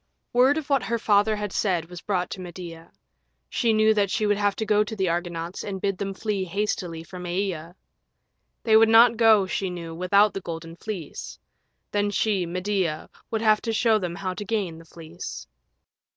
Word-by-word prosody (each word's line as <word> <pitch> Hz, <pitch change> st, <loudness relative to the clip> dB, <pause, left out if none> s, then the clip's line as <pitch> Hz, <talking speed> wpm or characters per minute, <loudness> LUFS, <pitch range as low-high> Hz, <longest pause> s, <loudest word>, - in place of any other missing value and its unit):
Word 260 Hz, +4 st, +5 dB
of 315 Hz, -, -4 dB
what 275 Hz, -3 st, +2 dB
her 235 Hz, -, -1 dB
father 215 Hz, -1 st, +3 dB
had 210 Hz, -2 st, -4 dB
said 180 Hz, -6 st, 0 dB
was 175 Hz, 0 st, -9 dB
brought 180 Hz, -3 st, -1 dB
to 185 Hz, -, -6 dB
Medea. 170 Hz, -2 st, -9 dB, 0.6 s
She 230 Hz, -, +2 dB
knew 215 Hz, 0 st, +4 dB
that 205 Hz, -2 st, +1 dB
she 215 Hz, +2 st, 0 dB
would 205 Hz, 0 st, +3 dB
have 205 Hz, -1 st, +1 dB
to 220 Hz, -, -3 dB
go 210 Hz, 0 st, +3 dB
to 215 Hz, +1 st, -6 dB
the 190 Hz, -3 st, 0 dB
Argonauts 170 Hz, 0 st, -3 dB
and 195 Hz, -2 st, -4 dB
bid 195 Hz, -1 st, -1 dB
them 195 Hz, -1 st, -3 dB
flee 205 Hz, -2 st, -2 dB
hastily 180 Hz, -3 st, -3 dB
from 180 Hz, 0 st, -9 dB
Aea. 175 Hz, -2 st, -3 dB, 0.9 s
They 220 Hz, -2 st, +4 dB
would 220 Hz, 0 st, +7 dB
not 230 Hz, +1 st, +7 dB
go, 220 Hz, -3 st, +5 dB
she 190 Hz, 0 st, -2 dB
knew, 170 Hz, -2 st, -6 dB
without 200 Hz, +5 st, +3 dB
the 195 Hz, -, -4 dB
Golden 165 Hz, -1 st, -7 dB
Fleece; 170 Hz, -, -7 dB, 0.5 s
then 205 Hz, 0 st, +1 dB
she, 200 Hz, -3 st, 0 dB
Medea, 180 Hz, -2 st, -2 dB, 0.2 s
would 225 Hz, -1 st, -2 dB
have 215 Hz, -1 st, +4 dB
to 230 Hz, -, -2 dB
show 225 Hz, -1 st, +3 dB
them 175 Hz, -3 st, -4 dB
how 190 Hz, -1 st, -3 dB
to 205 Hz, -, -6 dB
gain 195 Hz, -6 st, -2 dB
the 165 Hz, -, -14 dB
Fleece. 165 Hz, +1 st, -8 dB
195 Hz, 195 wpm, -25 LUFS, 175-215 Hz, 0.9 s, would